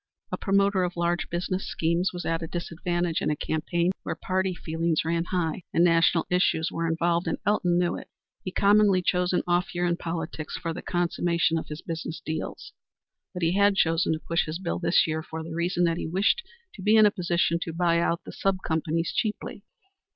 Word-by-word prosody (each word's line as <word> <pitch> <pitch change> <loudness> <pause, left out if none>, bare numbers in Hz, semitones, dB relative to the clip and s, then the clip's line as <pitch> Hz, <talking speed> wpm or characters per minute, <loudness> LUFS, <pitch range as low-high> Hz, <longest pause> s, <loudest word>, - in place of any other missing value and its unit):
A - - 0
promoter 200 -1 +2
of 180 -1 -3
large 170 0 0
business 180 +2 -2
schemes 170 +3 0
was 180 -1 -6
at 165 0 -1
a 165 - -4
disadvantage 175 0 -2
in - - 0
a 150 - +1
campaign 170 +4 0
where - - -4
party 190 0 -1
feelings 165 -1 -1
ran 165 +1 0
high 175 -1 -1
and 170 - +3
national 165 -1 +4
issues 180 -3 +2
were 165 0 -2
involved, 170 +1 +1
and - - 0
Elton 180 -4 +2
knew 175 -1 +1
it. - - -10 0.3
He 185 - -4
commonly 200 -1 +4
chose 180 0 +1
an 180 - +1
off 175 +1 0
year 175 0 +1
in 170 -1 +1
politics 165 -2 -4
for 165 - -3
the 180 - -6
consummation 170 -2 0
of - - -8
his 150 +1 -7
business 165 0 -5
deals. 155 0 -5 0.6
But 180 -3 -5
he 165 - +3
had 200 0 +4
chosen 165 -2 +2
to 155 - -3
push 170 +1 -1
his 155 +1 -3
bill 175 -2 -3
this 175 - +3
year 160 0 -2
for 160 0 -7
the 160 0 -7
reason 175 +2 0
that 165 -1 +2
he - - -3
wished 195 - +2 0.3
to 195 - -10
be 210 +3 +4
in 215 -1 +7
a 210 - +5
position 170 -2 0
to 165 - -3
buy 170 0 +2
out 170 0 0
the - - -9
sub 195 -1 -1
companies 160 +1 -1
cheaply. 210 -2 -2
170 Hz, 210 wpm, -26 LUFS, 165-180 Hz, 0.6 s, in